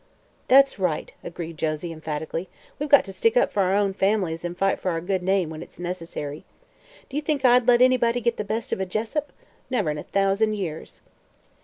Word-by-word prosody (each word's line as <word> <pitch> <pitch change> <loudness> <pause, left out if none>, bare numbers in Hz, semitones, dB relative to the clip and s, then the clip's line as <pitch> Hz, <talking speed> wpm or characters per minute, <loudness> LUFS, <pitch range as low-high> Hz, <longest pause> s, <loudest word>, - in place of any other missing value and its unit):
"That's 275 -4 +5
right," 175 -5 -1
agreed 165 -2 -7
Josie, 155 +2 -2
emphatically. 160 +2 -5 0.3
"We've 295 +1 -3
got 280 -1 +7
to 195 - -8
stick 225 +5 +2
up - - +3
for 200 - +1
our 190 0 +2
own 200 -1 +1
families 190 -5 0
and 175 0 -5
fight 195 +1 +1
for 185 - -2
our 165 -2 -1
good 185 +2 -1
name 185 -3 +1
when 155 0 -7
it's - - -12
necessary. 165 -4 -5 0.6
Do 280 - -5
you - - 0
think 290 -2 -1
I'd 250 -1 +5
let 245 0 +6
anybody 245 -2 +3
get 235 0 0
the - - -2
best 220 +3 -3
of - - -2
a 190 - -1
Jessup? 230 +10 -3 0.4
Never 245 -12 0
in 150 - -4
a - - -6
thousand 200 +2 +1
years!" 165 -6 -6
195 Hz, 205 wpm, -24 LUFS, 170-235 Hz, 0.6 s, got